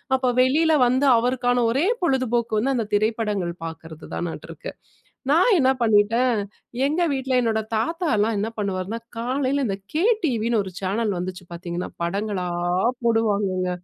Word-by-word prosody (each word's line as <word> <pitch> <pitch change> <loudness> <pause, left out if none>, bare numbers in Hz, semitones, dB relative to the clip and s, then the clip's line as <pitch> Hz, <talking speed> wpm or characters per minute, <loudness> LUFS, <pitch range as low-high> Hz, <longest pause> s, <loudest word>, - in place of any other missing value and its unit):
அப்போ 260 -1 +1
வெளியில 315 +5 +3
வந்து 260 +3 +2
அவருக்கான 245 0 +1
ஒரே 290 +10 +1 0.2
பொழுதுபோக்கு 240 -6 +1
வந்து 265 +4 0
அந்த 220 -3 -2
திரைப்படங்கள் 210 -5 0
பார்க்குறதுதானாட்ருக்கு. 160 +1 -7 0.6
நான் 365 +10 +5
என்னா 265 -3 +4
பண்ணிட்டேன், 225 +2 +3 0.5
எங்க 310 +5 0
வீட்ல 265 -1 0
என்னோட 220 -2 +1
தாத்தால்லாம் 225 - 0
என்ன 215 +3 -1
பண்ணுவாருனா, 200 +2 -3 0.2
காலையில 265 +3 0
இந்த 195 -1 -2 0.2
கே 320 +4 +1 0.2
டிவின்னு 230 -4 +1
ஒரு 190 - -8
சேனல் 200 0 -1
வந்துச்சு 180 0 -6
பார்த்தீங்கன்னா, 175 +1 -5
படங்களா 195 +1 -2 0.6
போடுவாங்கங்க. 205 -5 +1
225 Hz, 125 wpm, -23 LUFS, 200-260 Hz, 0.6 s, நான்